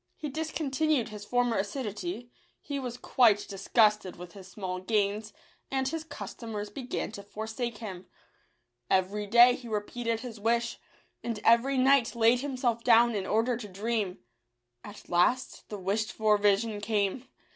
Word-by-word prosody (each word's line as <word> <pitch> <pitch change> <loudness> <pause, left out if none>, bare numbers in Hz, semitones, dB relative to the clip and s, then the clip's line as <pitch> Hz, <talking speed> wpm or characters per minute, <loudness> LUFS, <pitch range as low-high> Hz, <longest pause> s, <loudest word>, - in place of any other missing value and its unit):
He 300 - -5
discontinued 310 -3 -1
his 210 -1 -8
former 245 -1 +1
assi 210 +7 -5
duity; 245 - -5 0.3
he 285 -1 -4
was 245 -2 -5
quite 220 -6 +3
disgusted 210 0 +2
with 175 0 -10
his 195 -3 -11
small 185 -2 -5
gains, 210 +1 0 0.4
and 265 -1 0
his 325 +3 -3
customers 220 -9 -7
began 255 -6 -4
to 200 - -8
forsake 220 +3 -5
him. 190 -5 -8 0.8
Every 200 +3 +1
day 240 +3 +7
he 245 -1 -8
repeated 225 +2 -2
his 230 -3 -8
wish, 235 +2 0 0.4
and 230 -3 -3
every 240 +4 +4
night 260 -2 +4
laid 235 +1 +4
himself 255 -4 -1
down 235 0 +5
in 200 -3 -2
order 230 +3 +1
to 220 -3 -7
dream. 205 -1 -2 0.7
At 205 0 -11
last 210 +9 +1
the 210 - -5
wished 200 +3 -1
for 215 -1 +3
vision 205 +1 +2
came. 215 +3 -1
225 Hz, 150 wpm, -29 LUFS, 205-245 Hz, 0.8 s, day